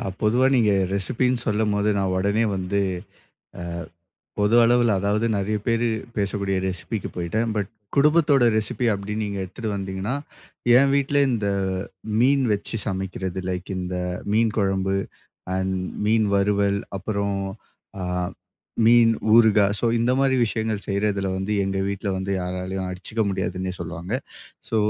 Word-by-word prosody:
அ - - -4 0.2
பொதுவா 120 +5 +3
நீங்க 110 -4 +4 0.2
ரெசிபின்னு 125 +5 0
சொல்லும்போது, 105 -1 +1
நான் 95 -1 0
உடனே 100 +4 +2
வந்து 95 +2 -1 1.4
அ, - - -77 0.2
பொது 105 +3 +4
அளவுல 120 -1 +4
அதாவது 105 +3 +1
நெறைய 100 +2 0
பேரு 115 0 +2 0.3
,பேசக்கூடிய 100 -1 -1
ரெசிபிக்கு 95 +4 -4
போயிட்டேன். 110 +7 -1
பட், 100 -3 -1 0.3
குடும்பத்தோட 145 -3 +4
ரெசிபி 110 +3 -1
அப்படின்னு 105 +2 -3
நீங்க 100 -1 -4
எடுத்துட்டு 110 +4 -5
வந்தீங்கன்னா, 95 +4 -3 0.6
என் 140 0 +4
வீட்டுல 140 +1 +2
இந்த, 105 -4 0 0.7
"மீன் 135 +2 +4
வச்சு 105 +2 -3
சமைக்கிறது 95 -2 -3
லைக் 90 +1 -4
இந்த 90 0 -3 0.4
மீன் 110 -1 +3
குழம்பு, 95 -1 +1 0.6
அண்ட் 95 0 -1 0.3
மீன் 110 0 +3
வறுவல், 100 0 +2 0.2
அப்புறம் 100 0 -2 0.6
அ, - - -3 0.8
மீன் 115 0 +6 0.2
ஊறுகா". 110 -3 +6
சோ - - -2 0.2
இந்த 120 +2 +2
மாரி 135 -1 +3
விஷயங்கள் 110 -2 -2
செய்றதுல 100 -1 0
வந்து, 100 +3 -2
எங்க 95 0 -1
வீட்டுல 100 0 -3
வந்து 95 +1 -2
யாராலயும் 90 +1 -3
அடிச்சுக்க 95 +5 -3
முடியாதுன்னே 95 0 -2
சொல்லுவாங்க. 85 +3 -6 0.6
சோ, 115 - +1
100 Hz, 135 wpm, -23 LUFS, 95-115 Hz, 1.4 s, மீன்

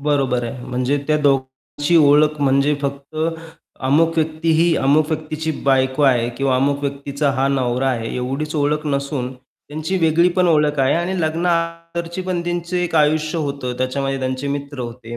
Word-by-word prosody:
बरोबर 135 -4 0
आहे. 125 +2 -6
म्हणजे 125 +3 -1
त्या 155 - +2
दोघांची 140 +3 0
ओळख 150 0 +4
म्हणजे 140 +1 +3
फक्त 140 +2 -5 0.7
अमुक 160 +5 +3
व्यक्ती 160 +1 0
ही, 165 +1 +3
अमुक 145 +3 +3
व्यक्तीची 155 0 -3
बायको 130 +1 +2
आहे 125 -4 +3
किंवा 135 -1 +1
अमुक 140 +2 +1
व्यक्तीचा 140 +1 -2
हा 135 +1 +2
नवरा 130 -1 0
आहे, 115 -3 -3
एवढीच 135 +5 -3
ओळख 150 +1 0
नसून 140 -2 -2
त्यांची 150 +7 -6
वेगळी 165 +1 +3
पण 180 -1 +4
ओळख 150 -2 +2
आहे 130 - +3
आणि 175 +2 -1
लग्ना 165 +2 0 0.4
अगोदरची 170 +2 -4
पण 180 -1 -2
त्यांचे 175 +1 -2
एक 170 - -5
आयुष्य 155 +2 +2
होतं, 140 -4 -3
त्याच्यामध्ये 135 +1 -1
त्यांचे 130 +1 -3
मित्र 140 -1 -4
होते, 120 -1 -7
145 Hz, 160 wpm, -20 LUFS, 135-155 Hz, 0.7 s, ओळख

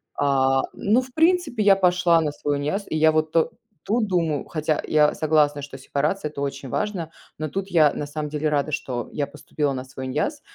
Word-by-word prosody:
А, 135 -1 +2
ну, 225 +5 +2
в 255 0 -11
принципе, 325 - +2
я 200 -1 +6
пошла 180 -3 +3
на 150 -2 -1
свой 145 0 -2
иняз, 195 +8 -2
и - - -2
я 155 0 +5
вот 155 0 0 0.5
тут 225 +1 +1
думаю, 165 -6 0
хотя 155 -1 -1
я 150 -1 +4
согласна, 150 -2 +2
что 135 -1 -8
сепарация- 150 +6 -1
это 140 -1 -7
очень 140 -1 -4
важно, 185 - -2 0.3
но 155 - -2
тут 195 +3 -4
я, 155 -4 +4
на 145 - -4
самом 150 0 -4
деле, 150 0 -1
рада, 150 +1 0
что 125 -5 -3
я 145 -2 -1
поступила 150 0 -3
на 130 0 -5
свой 130 0 -8
иняз, 155 - -2
155 Hz, 200 wpm, -23 LUFS, 145-180 Hz, 0.5 s, я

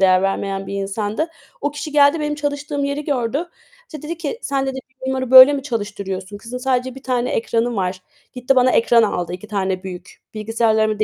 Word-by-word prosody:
değer 185 -1 +5
vermeyen 195 0 -2
bir - - -5
insandı. 205 +9 -2 0.3
O 290 - -1
kişi 290 +1 -6
geldi, 290 +2 +5
benim 300 0 -1
çalıştığım 290 0 -3
yeri 280 +1 -2
gördü. 280 +4 -1 0.4
İşte 305 -4 -9
dedi 320 +2 -5
ki, 330 +6 -4
"Sen." 275 -1 -1
dedi 265 0 -3 0.3
"Bunları 260 -1 -2
böyle 260 +2 +10
mi 280 -2 -2
çalıştırıyorsun? 205 -5 -4
Kızın 240 +4 -7
sadece 255 0 -1
1 270 - -11
tane 250 -2 -1
ekranı 230 +1 0
var." 185 -1 -2 0.3
Gitti 255 +1 0
bana 255 0 +5
ekran 235 0 +4
aldı 180 -5 -1
2 185 +4 -7
tane 190 -3 -2
büyük. 180 -1 -9
Bilgisayarlarımı 220 0 +1
245 Hz, 185 wpm, -20 LUFS, 200-280 Hz, 0.4 s, böyle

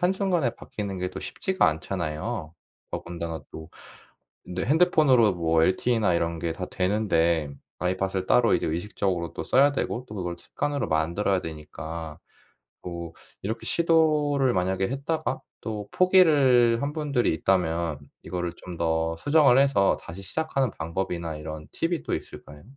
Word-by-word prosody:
한순간에 180 -6 +1
바뀌는 100 -3 -6
게 90 0 -2
또 - - -7
쉽지가 190 0 0
않잖아요. 80 +2 -3 0.4
더군다나 85 -2 -5
또 80 +1 -10 0.8
근데 90 0 -3
핸드폰으로 145 - +4
뭐 80 -2 +2
LTE나 105 +2 +2
이런 85 -1 -1
게 85 0 -2
다 90 - -5
되는데 85 -6 +1 0.3
아이팟을 95 +1 -1
따로 120 +4 +4
이제 - - +1
의식적으로 85 0 -2
또 - - -4
써야 140 +2 +4
되고 125 -2 -2
또 105 - -9
그걸 90 -3 -4
습관으로 145 +8 -2
만들어야 85 +5 +1
되니까. 80 0 -7 0.6
뭐 85 -2 -6 0.3
이렇게 110 +4 -4
시도를 150 -5 +2
만약에 95 +1 0
했다가 140 +4 -2 0.2
또 105 -2 -5
포기를 140 -11 +5
한 145 +1 -2
분들이 140 - +1
있다면 85 -3 0 0.2
이거를 90 0 -3
좀 90 -2 -9
더 80 0 0
수정을 145 - +4
해서 135 -8 +4
다시 85 +4 -9
시작하는 135 +2 -1
방법이나 85 -1 -3
이런 75 0 -7
팁이 165 -2 -1
또 - - -3
있을까요? 75 -1 -7
95 Hz, 330 characters per minute, -26 LUFS, 85-135 Hz, 0.8 s, 포기를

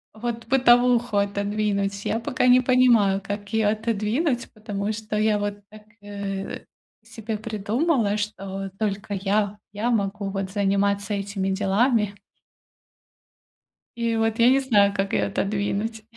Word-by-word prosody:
вот 230 +1 -5
бытовуху 245 -3 +4
отодвинуть. 200 0 -1
Я 225 - 0
пока 250 +1 0
не 250 0 +7
понимаю, 240 -6 +4
как 205 0 -5
её 220 -2 +3
отодвинуть, 230 +5 -1
потому 210 -1 -4
что 215 0 -5
я 215 0 +2
вот 205 0 -3
так, 215 0 -14 0.2
э, 200 -1 -5 0.4
себе 220 -1 -6
придумала, 215 +2 0
что 195 -2 -5
только 205 -1 -2
я 205 +1 0
я 220 +4 -1
могу 200 -2 -1
вот 195 -1 -3
заниматься 200 +1 0
этими 195 -1 -2
делами. 205 +2 +1 1.8
И 230 -1 0
вот 225 +1 0
я 235 +1 +6
не 265 +1 +4
знаю, 205 -7 +3
как 195 0 -1
её 105 - +1
отодвинуть. 205 - -2
210 Hz, 130 wpm, -24 LUFS, 200-230 Hz, 1.8 s, не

